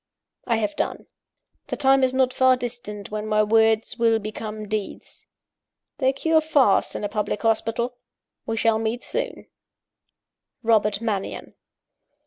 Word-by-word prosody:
"I 235 Hz, -, +2 dB
have 210 Hz, -2 st, -1 dB
done. -, -, -3 dB, 0.6 s
The -, -, -4 dB
time 270 Hz, 0 st, +4 dB
is 260 Hz, -, +3 dB
not 260 Hz, -1 st, +1 dB
far 260 Hz, 0 st, +4 dB
distant 240 Hz, -5 st, -6 dB
when 215 Hz, 0 st, -4 dB
my 215 Hz, 0 st, +3 dB
words 220 Hz, +2 st, +2 dB
will 230 Hz, -1 st, +4 dB
become 215 Hz, 0 st, -6 dB
deeds. 215 Hz, -1 st, -6 dB, 0.7 s
They 265 Hz, -2 st, +3 dB
cure 315 Hz, +4 st, +2 dB
fast 285 Hz, -9 st, +2 dB
in -, -, -4 dB
a -, -, 0 dB
public 210 Hz, +1 st, -3 dB
hospital: 225 Hz, +2 st, 0 dB, 0.5 s
we 225 Hz, -, -2 dB
shall 225 Hz, -1 st, +2 dB
meet 225 Hz, +2 st, -2 dB
soon! -, -, -3 dB, 1.2 s
"ROBERT 215 Hz, -2 st, +2 dB
MANNION." 210 Hz, -4 st, -3 dB
225 Hz, 135 wpm, -24 LUFS, 215-250 Hz, 1.2 s, time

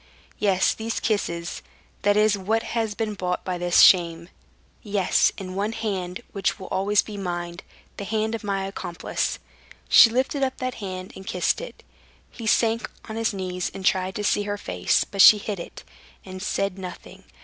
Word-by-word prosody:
"Yes, 195 Hz, -3 st, +2 dB
these 225 Hz, +1 st, -3 dB
kisses—that 200 Hz, +1 st, -2 dB
is 215 Hz, 0 st, +4 dB
what 215 Hz, +4 st, -1 dB
has 225 Hz, -3 st, -2 dB
been 220 Hz, -1 st, -2 dB
bought 180 Hz, -2 st, -3 dB
by 180 Hz, -1 st, -3 dB
this 175 Hz, 0 st, +4 dB
shame. 170 Hz, -2 st, +5 dB, 0.5 s
Yes, 200 Hz, -4 st, +2 dB
and 185 Hz, -1 st, -7 dB
one 205 Hz, +3 st, -1 dB
hand, 185 Hz, -5 st, -3 dB
which 195 Hz, 0 st, -1 dB
will 190 Hz, -, -9 dB
always 205 Hz, +2 st, +2 dB
be 210 Hz, -2 st, -8 dB
mine—the 175 Hz, +1 st, -7 dB
hand 220 Hz, +1 st, -1 dB
of 225 Hz, -, -4 dB
my 195 Hz, -1 st, -1 dB
accomplice." 175 Hz, -3 st, -3 dB, 0.5 s
She 230 Hz, -, +9 dB
lifted 260 Hz, +4 st, -1 dB
up 265 Hz, -1 st, 0 dB
that 255 Hz, 0 st, -3 dB
hand 185 Hz, -1 st, -6 dB
and 190 Hz, -, -11 dB
kissed 180 Hz, -, 0 dB
it. -, -, -10 dB, 0.5 s
He 230 Hz, -2 st, -7 dB
sank 230 Hz, +1 st, +2 dB, 0.2 s
on 220 Hz, -, -6 dB
his 225 Hz, 0 st, 0 dB
knees 185 Hz, -2 st, -3 dB
and 190 Hz, -, -6 dB
tried 185 Hz, 0 st, +1 dB
to 210 Hz, -, -3 dB
see 205 Hz, -, +2 dB
her 205 Hz, 0 st, -3 dB
face; 90 Hz, -, 0 dB
but 195 Hz, -, 0 dB
she 210 Hz, -, +10 dB
hid 205 Hz, -2 st, -5 dB
it, -, -, -9 dB, 0.4 s
and 185 Hz, 0 st, -8 dB
said 195 Hz, -1 st, -2 dB
nothing. 180 Hz, -2 st, -9 dB
195 Hz, 170 wpm, -24 LUFS, 185-215 Hz, 0.5 s, she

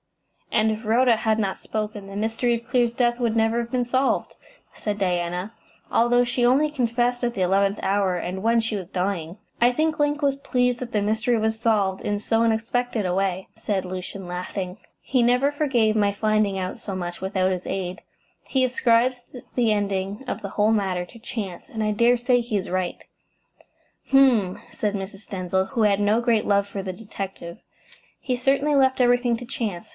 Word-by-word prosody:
"And 220 Hz, -1 st, +3 dB
if 215 Hz, +1 st, -4 dB
Rhoda 235 Hz, +2 st, +4 dB
had 220 Hz, 0 st, 0 dB
not 195 Hz, -3 st, -1 dB
spoken, 210 Hz, -2 st, -4 dB
the 195 Hz, -, -9 dB
mystery 225 Hz, +3 st, 0 dB
of 235 Hz, +1 st, -8 dB
Clear's 240 Hz, -2 st, +2 dB
death 240 Hz, 0 st, +1 dB
would 235 Hz, -2 st, 0 dB
never 225 Hz, +1 st, +2 dB
have 235 Hz, 0 st, -4 dB
been 250 Hz, -1 st, 0 dB
solved," 260 Hz, +2 st, 0 dB, 0.4 s
said 210 Hz, -1 st, -4 dB
Diana, 180 Hz, +2 st, -1 dB, 0.4 s
"although 245 Hz, +1 st, +4 dB
she 245 Hz, 0 st, 0 dB
only 275 Hz, +5 st, +4 dB
confessed 245 Hz, -2 st, 0 dB
at 240 Hz, 0 st, 0 dB
the 190 Hz, -, -2 dB
eleventh 195 Hz, +2 st, +2 dB
hour, 195 Hz, -2 st, +1 dB
and 180 Hz, +3 st, -4 dB
when 230 Hz, +1 st, +3 dB
she 225 Hz, -1 st, -1 dB
was 185 Hz, -3 st, -5 dB
dying." 180 Hz, -2 st, -2 dB, 0.2 s
"I 240 Hz, +1 st, +6 dB
think 310 Hz, +4 st, 0 dB
Link 295 Hz, +1 st, +1 dB
was 280 Hz, -1 st, +2 dB
pleased 250 Hz, -3 st, 0 dB
that 250 Hz, -1 st, -6 dB
the 210 Hz, -, +1 dB
mystery 220 Hz, +3 st, +1 dB
was 220 Hz, 0 st, 0 dB
solved 205 Hz, -5 st, +1 dB
in 205 Hz, 0 st, -1 dB
so 225 Hz, +2 st, +1 dB
unexpected 230 Hz, 0 st, 0 dB
a 180 Hz, -, 0 dB
way," 190 Hz, 0 st, -1 dB
said 195 Hz, -3 st, -2 dB
Lucian, 185 Hz, +1 st, -6 dB
laughing. 180 Hz, +1 st, -5 dB, 0.2 s
"He 255 Hz, -3 st, +1 dB
never 250 Hz, +4 st, +3 dB
forgave 255 Hz, -7 st, +1 dB
my 205 Hz, -2 st, +3 dB
finding 215 Hz, -1 st, +1 dB
out 185 Hz, 0 st, -4 dB
so 195 Hz, -, -5 dB
much 175 Hz, -1 st, -5 dB
without 190 Hz, -1 st, 0 dB
his 180 Hz, -1 st, -3 dB
aid. 185 Hz, +1 st, -4 dB, 0.4 s
He 265 Hz, -1 st, 0 dB
ascribes 250 Hz, 0 st, +2 dB, 0.4 s
the 235 Hz, -3 st, +3 dB
ending 200 Hz, +1 st, -1 dB
of -, -, -3 dB
the 200 Hz, -, -5 dB
whole 210 Hz, +2 st, +2 dB
matter 190 Hz, -5 st, 0 dB
to 230 Hz, -, -15 dB
chance, 205 Hz, -7 st, -5 dB
and 220 Hz, -1 st, -3 dB
I 215 Hz, -, +1 dB
dare 235 Hz, +3 st, +4 dB
say 245 Hz, +1 st, +2 dB
he 230 Hz, -3 st, -2 dB
is 190 Hz, -, -4 dB
right." 185 Hz, -1 st, -1 dB, 1.1 s
"H'm!" 250 Hz, -9 st, +4 dB
said 210 Hz, -1 st, -2 dB
Mrs. 195 Hz, +1 st, -7 dB
Denzil, 190 Hz, 0 st, -1 dB
who 235 Hz, -5 st, 0 dB
had 205 Hz, -1 st, +3 dB
no 210 Hz, +3 st, +2 dB
great 235 Hz, -3 st, +2 dB
love 200 Hz, -1 st, +2 dB
for 200 Hz, -1 st, -5 dB
the 185 Hz, -1 st, -4 dB
detective. 195 Hz, -2 st, -7 dB, 0.6 s
"He 255 Hz, -, -1 dB
certainly 275 Hz, +4 st, +2 dB
left 265 Hz, -1 st, +3 dB
everything 245 Hz, -1 st, +3 dB
to 245 Hz, -, -8 dB
chance. 220 Hz, -8 st, -4 dB
220 Hz, 190 wpm, -24 LUFS, 195-245 Hz, 1.1 s, I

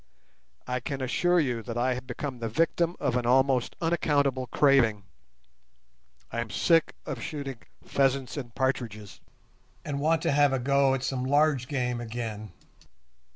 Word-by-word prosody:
I 125 Hz, 0 st, -2 dB
can 135 Hz, +2 st, -4 dB
assure 175 Hz, +7 st, +2 dB
you 125 Hz, -7 st, -1 dB
I 125 Hz, +2 st, +1 dB
have 125 Hz, +1 st, -7 dB
become 135 Hz, -4 st, -5 dB
the 115 Hz, -1 st, -3 dB
victim 165 Hz, +6 st, +1 dB
of 125 Hz, -, 0 dB
an 125 Hz, -1 st, 0 dB
almost 130 Hz, 0 st, +2 dB
unaccountable 140 Hz, -6 st, +1 dB
craving. 120 Hz, -9 st, +3 dB, 1.3 s
I 115 Hz, -, -3 dB
am 115 Hz, -, -5 dB
sick 165 Hz, -, +2 dB
of -, -, -5 dB
shooting 140 Hz, -5 st, -5 dB, 0.2 s
pheasants 135 Hz, -1 st, 0 dB
and 120 Hz, -6 st, -7 dB
partridges, 115 Hz, -6 st, -2 dB, 0.7 s
and 145 Hz, -2 st, -3 dB
want 160 Hz, +2 st, +1 dB
to -, -, +2 dB
have 145 Hz, -1 st, +4 dB
a 135 Hz, -, +1 dB
go 140 Hz, +1 st, +3 dB
at 130 Hz, -, -4 dB
some 130 Hz, -2 st, -2 dB
large 145 Hz, -1 st, +2 dB
game 125 Hz, -3 st, -2 dB
again. 110 Hz, -3 st, -5 dB
130 Hz, 150 wpm, -27 LUFS, 120-145 Hz, 1.3 s, have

